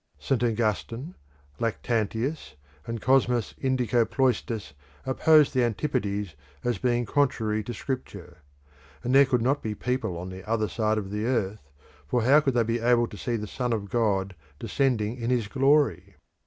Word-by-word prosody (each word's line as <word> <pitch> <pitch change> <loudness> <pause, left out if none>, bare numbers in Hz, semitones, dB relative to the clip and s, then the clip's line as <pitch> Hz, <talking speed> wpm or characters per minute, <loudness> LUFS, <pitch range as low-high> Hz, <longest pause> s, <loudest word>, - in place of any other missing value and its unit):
St. 130 -3 -1
Augustine, 115 - -1 0.5
Lactantius, 115 - -2 0.3
and 115 0 -3
Cosmas 125 -2 +2
Indicopleustes 120 - 0 0.3
opposed 150 +3 +4
the 130 -2 +2
Antipodes 105 - -1 0.3
as 120 -1 -1
being 120 -1 +1
contrary 110 -6 0
to 120 - -6
Scripture; 100 -7 -6 0.7
and 125 - -1
there 140 0 +7
could 125 -3 +1
not 140 +4 +1
be 110 -1 -3
people 125 -8 -2
on 90 +2 -6
the 95 0 -9
other 110 -1 +1
side 110 +3 0
of 100 -2 -4
the 105 +1 -2
earth, 100 - -2 0.4
for 120 +8 +1
how 140 +5 +6
would 135 -4 0
they 120 - +4
be 115 +1 -1
able 120 0 +3
to 115 - -10
see 120 +3 -2
the 105 -2 -3
Son 125 +4 -3
of 100 -3 -4
God 100 -5 +1 0.2
descending 115 - 0
in 115 -1 -3
his 120 -4 +1
glory? 130 - +2
115 Hz, 155 wpm, -26 LUFS, 105-130 Hz, 0.7 s, there